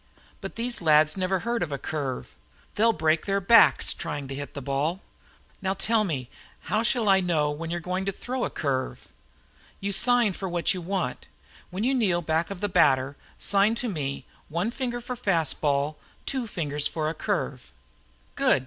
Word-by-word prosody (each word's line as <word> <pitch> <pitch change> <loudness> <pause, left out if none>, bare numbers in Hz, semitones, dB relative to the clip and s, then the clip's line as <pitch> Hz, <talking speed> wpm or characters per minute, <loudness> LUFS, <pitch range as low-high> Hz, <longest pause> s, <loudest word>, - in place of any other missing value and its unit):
But - - -7
these 235 -1 0
lads 155 -1 +5
never 185 -1 0
heard 235 0 -1
of 165 - -2
a 140 - -1
curve. 135 - -4 0.4
They'll 230 +2 +4
break 160 -4 +1
their 200 0 +2
backs 225 +4 +6
trying 145 -2 -5
to - - -4
hit 140 0 -7
the - - -3
ball. 145 +8 -1 0.6
Now 190 0 0
tell 220 +2 +2
me 140 -10 -3 0.3
how 215 - 0
I - - 0
shall 215 -5 +3
know 155 -5 +1
when 160 +3 -5
you 170 - -1
are 170 - -9
going 185 +1 -2
to 195 - 0
throw 245 +6 -4
a - - 0
curve." 130 -4 -3 0.7
"You 200 +1 -2
sign 235 +1 +3
for 190 +1 -5
what 175 +1 +2
you 185 - -5
want. 190 +3 -3 0.4
When 185 +3 -4
you 260 +3 +2
kneel 190 -9 +2
back 160 +1 0
of 195 -2 -7
the 205 - +1
batter 145 -7 +3 0.2
sign 200 +3 +2
to 245 - -1
me, 140 -7 -3 0.2
one 175 +8 -1
finger 240 -1 -3
for 250 +1 -5
fastball, 155 - 0 0.3
two 260 -4 -1
fingers 150 -7 -1
for 155 -2 -2
a 155 - -1
curve." - - -3 0.6
"Good!" 275 - +3
180 Hz, 185 wpm, -26 LUFS, 150-215 Hz, 0.7 s, backs